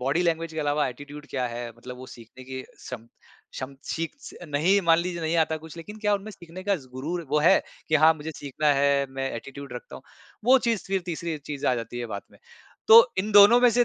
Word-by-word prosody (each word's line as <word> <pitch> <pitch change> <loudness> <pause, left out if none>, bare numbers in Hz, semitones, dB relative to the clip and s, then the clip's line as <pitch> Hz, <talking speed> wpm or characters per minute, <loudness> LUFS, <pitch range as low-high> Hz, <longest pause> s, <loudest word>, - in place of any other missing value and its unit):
Body 140 +7 +1
language 165 -1 -1
के 160 - -6
अलावा 145 0 +1
attitude 145 +3 -10
क्या 130 -2 -1
है 120 0 -5
मतलब 125 +1 -9
वो 130 +1 -10
सीखने 120 +1 -13
की 130 0 -6
क्षम, 120 -3 -10 0.5
क्षम 135 +1 -6 0.2
सीख 165 0 -2
स - - -10
नहीं 165 +8 +3
मान 165 0 +6
लीजिए 175 0 -3
नहीं 160 +1 0
आता 160 - -3
कुछ 160 0 -11
लेक़िन 205 +6 -9
क्या 210 -1 +2
उनमें 200 +2 -5
सीखने 175 -2 -11
का 200 -1 +2
ज़ 140 -6 -13
गुरुर 155 +7 -4
वो 150 - +3
है 180 +5 +5 0.3
कि 155 - +1
हाँ, 155 +1 +6
मुझे 155 +1 -7
सीखना 145 +2 -3
है 140 0 +2
मैं 135 0 -3
एटीट्यूड 135 +3 -9
रखता 125 - -8
हूँ - - -13 0.4
वो 260 +3 +6
चीज़ 225 -4 0
फ़िर 195 0 0
तीसरी 170 -1 -3
चीज़ 145 -2 -4
आ 125 - +3
जाती 115 +1 -5
है 120 - -3
बात 100 - -4
में। - - -19 0.5
तो 230 +1 +11 0.2
इन 210 +3 -1
दोनों 205 +4 +8
में 245 - +6
से 245 +1 +3
155 Hz, 235 wpm, -26 LUFS, 135-180 Hz, 0.5 s, तो